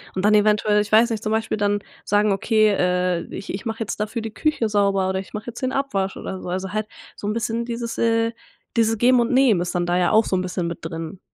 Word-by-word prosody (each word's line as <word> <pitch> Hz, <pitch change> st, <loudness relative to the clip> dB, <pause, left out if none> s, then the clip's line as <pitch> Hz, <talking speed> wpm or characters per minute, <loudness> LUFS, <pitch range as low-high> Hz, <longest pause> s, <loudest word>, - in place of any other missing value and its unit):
und 185 Hz, -, -2 dB
dann 210 Hz, +1 st, +4 dB
eventuell, 210 Hz, 0 st, +3 dB
ich 205 Hz, -, -5 dB
weiß 230 Hz, +2 st, +6 dB
nicht, 220 Hz, -2 st, -2 dB
zum 215 Hz, 0 st, -1 dB
Beispiel 220 Hz, 0 st, -1 dB
dann 205 Hz, 0 st, +1 dB, 0.3 s
sagen 205 Hz, 0 st, +2 dB
okay: 215 Hz, +2 st, +3 dB
„Äh, 180 Hz, -3 st, +1 dB
ich 200 Hz, -, -6 dB
ich 195 Hz, -, -6 dB
mache 225 Hz, 0 st, -3 dB
jetzt 210 Hz, -, -3 dB
dafür 215 Hz, +2 st, -2 dB
die 220 Hz, -1 st, -6 dB
Küche 300 Hz, -8 st, 0 dB
sauber 200 Hz, -2 st, +2 dB
oder 190 Hz, -, -1 dB
ich 190 Hz, -, -10 dB
mache 210 Hz, +2 st, -6 dB
jetzt 240 Hz, +1 st, -7 dB
den 255 Hz, 0 st, -1 dB
Abwasch 200 Hz, -9 st, -1 dB
oder 190 Hz, -, -6 dB
so.“ -, -, -8 dB
Also, 185 Hz, +1 st, -3 dB
halt 215 Hz, 0 st, -2 dB, 0.3 s
so 205 Hz, -, -5 dB
'n 210 Hz, -, 0 dB
bisschen 230 Hz, 0 st, -2 dB
dieses, 235 Hz, -1 st, -4 dB
äh 230 Hz, 0 st, +2 dB, 0.5 s
dieses 225 Hz, 0 st, +3 dB
Geben 245 Hz, +2 st, +4 dB
und 235 Hz, -, 0 dB
Nehmen 250 Hz, -9 st, +4 dB
ist 175 Hz, -, -3 dB
dann 175 Hz, 0 st, +1 dB
da 175 Hz, +1 st, +1 dB
ja 180 Hz, -1 st, +2 dB
auch 220 Hz, -, +5 dB
so -, -, 0 dB
'n -, -, 0 dB
bisschen 180 Hz, -1 st, -3 dB
mit 170 Hz, -, -5 dB
drin. 165 Hz, +2 st, -6 dB
210 Hz, 260 wpm, -22 LUFS, 190-225 Hz, 0.5 s, weiß